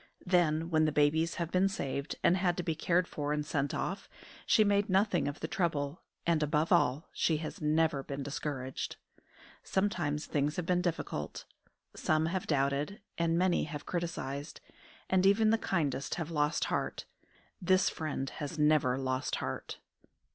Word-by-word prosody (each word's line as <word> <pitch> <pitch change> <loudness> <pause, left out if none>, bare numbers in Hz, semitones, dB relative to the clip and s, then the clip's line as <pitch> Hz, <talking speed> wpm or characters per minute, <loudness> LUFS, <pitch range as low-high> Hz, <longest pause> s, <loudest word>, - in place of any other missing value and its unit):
Then, 170 -2 +2
when 155 -1 +4
the 155 - +2
babies 155 +3 +2
have 170 -1 -3
been 185 +2 +3
saved 140 -6 -3
and 175 - +5
had 180 -2 +1
to 180 - -1
be 165 - 0
cared 170 +3 +1
for 145 -1 -3
and 150 0 -1
sent 145 -2 -1
off, 195 - -3 0.4
she 215 - +6
made 205 0 +2
nothing 190 -6 +2
of 145 - -5
the - - -2
trouble, 155 -4 -1 0.2
and 170 -2 +2
above 150 +2 +1
all 150 -4 +3
she 160 - +1
has 155 +1 -6
never 155 -1 +2
been 140 0 -5
discouraged. 135 -2 -4 0.7
Sometimes 175 -7 -1
things 145 +1 0
have 180 - -2
been 180 +1 +2
difficult. 165 - -3 0.5
Some 155 0 +1
have 180 +3 -2
doubted, 140 +5 0 0.2
and 165 0 +2
many 180 0 +2
have 150 -1 -7
criticised, 155 -5 -4 0.5
and 185 -1 +3
even 210 +3 +5
the 225 - +3
kindest 145 -10 -1
have 170 -1 -4
lost 150 0 +1
heart. - - -2 0.6
This 185 +1 +3
friend 150 -4 -2
has 150 +2 -5
never 150 -4 +3
lost 130 0 -1
heart. - - -4
160 Hz, 160 wpm, -32 LUFS, 145-180 Hz, 0.7 s, she